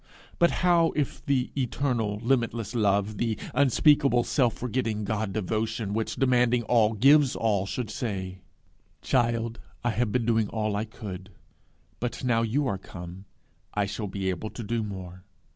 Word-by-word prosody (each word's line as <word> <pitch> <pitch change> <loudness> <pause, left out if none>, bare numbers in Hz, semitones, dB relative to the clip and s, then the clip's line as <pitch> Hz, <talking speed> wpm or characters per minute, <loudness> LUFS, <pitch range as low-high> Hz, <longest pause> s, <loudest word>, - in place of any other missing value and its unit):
But 170 - +5 0.2
how 170 -2 +4
if 145 -3 -2
the 130 -2 +1
eternal, 120 -5 -1
limitless 115 -3 0
Love, 105 -2 +1
the 115 -3 0 0.2
unspeakable, 140 -2 +4
self 125 -4 +1
forgetting 115 -3 -2
God 105 0 -2
devotion, 110 +1 -2
which, 110 +1 -2
demanding 125 -2 +3
all, 115 -1 +3
gives 135 +4 +5
all, 100 -4 0
should 115 0 -4
say, 95 -6 -4 0.6
'Child, 115 -2 0 0.2
I 120 - +1
have 115 0 0
been 125 -1 0
doing 110 -2 +2
all 110 -2 -1
I 105 +2 -1
could; 100 -4 -8 0.7
but 120 +1 -4
now 120 -2 +2
you 120 +6 0
are 95 -6 -2
come, 90 +1 -9 0.5
I 105 -1 +2
shall 105 +2 -4
be 95 -1 -2
able 95 +4 -5
to 115 - -7
do 115 +2 -1
more! 95 -3 -7
115 Hz, 155 wpm, -27 LUFS, 105-125 Hz, 0.7 s, But